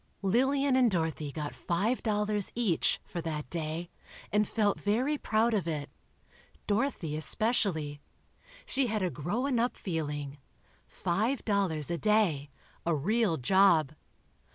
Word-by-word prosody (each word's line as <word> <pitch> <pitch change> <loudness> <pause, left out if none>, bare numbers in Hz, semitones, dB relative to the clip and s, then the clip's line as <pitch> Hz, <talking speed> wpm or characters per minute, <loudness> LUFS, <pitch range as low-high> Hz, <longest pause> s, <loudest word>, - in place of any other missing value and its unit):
Lillian 265 +7 +2
and 255 -2 +5
Dorothy 160 -5 -1
got 150 0 -4
five 205 +9 -1
dollars 210 -2 +1
each, 220 -9 +2
for 170 - -5
that 155 -2 -4
day, 165 +1 -3 0.4
and 210 0 +2
felt 210 -3 +1
very 245 +9 +1
proud 225 -3 +1
of 195 -6 0
it. 150 -3 -3 0.7
Dorothy 205 - -1
especially. 155 - 0 0.6
She 265 -1 +1
had 215 -3 -1
a 180 - 0
grown 230 - -1
up 240 +2 +1
feeling. 145 -5 -4 0.5
Five 215 +9 -1
dollars 185 -7 +1
a 170 - -1
day—a 170 -6 0
real 200 +3 +1
job. 160 0 +4
195 Hz, 125 wpm, -30 LUFS, 155-225 Hz, 0.7 s, and